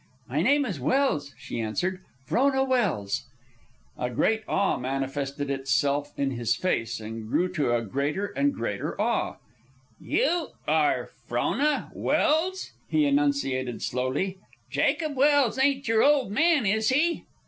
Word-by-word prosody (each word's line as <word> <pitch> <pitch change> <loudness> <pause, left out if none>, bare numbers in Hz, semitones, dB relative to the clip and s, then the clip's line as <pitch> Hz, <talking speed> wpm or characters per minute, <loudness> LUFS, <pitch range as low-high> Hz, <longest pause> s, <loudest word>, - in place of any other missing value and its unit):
"My 140 +5 -1
name 285 +8 +3
is 190 - -4
Welse," 145 - 0
she - - -5
answered. 180 - -2 0.2
"Frona 265 - +2
Welse." 210 - 0 0.7
A 125 - -1
great 220 - +1
awe 200 0 +1
manifested 135 +2 -3
itself 140 +1 0
in 140 -1 0
his 120 -2 0
face, 120 -10 -1
and 110 0 -7
grew 180 +9 +2
to 150 -9 0
a 115 - 0
greater 140 - -1
and 285 +7 0
greater - - -4
awe. - - 0 0.6
"You 350 -8 0
are - - +1 0.2
Frona 300 +1 0
Welse?" 330 +5 +1 0.2
he 305 -1 +3
enunciated 280 - 0
slowly. 135 +10 -2 0.3
"Jacob 310 -3 +1
Welse 275 -3 +3
ain't 275 -1 +1
your 225 0 +3
old 280 -7 +3
man, 305 +2 +3
is 215 +2 +2
he?" 320 +6 +1
190 Hz, 135 wpm, -26 LUFS, -, 0.7 s, name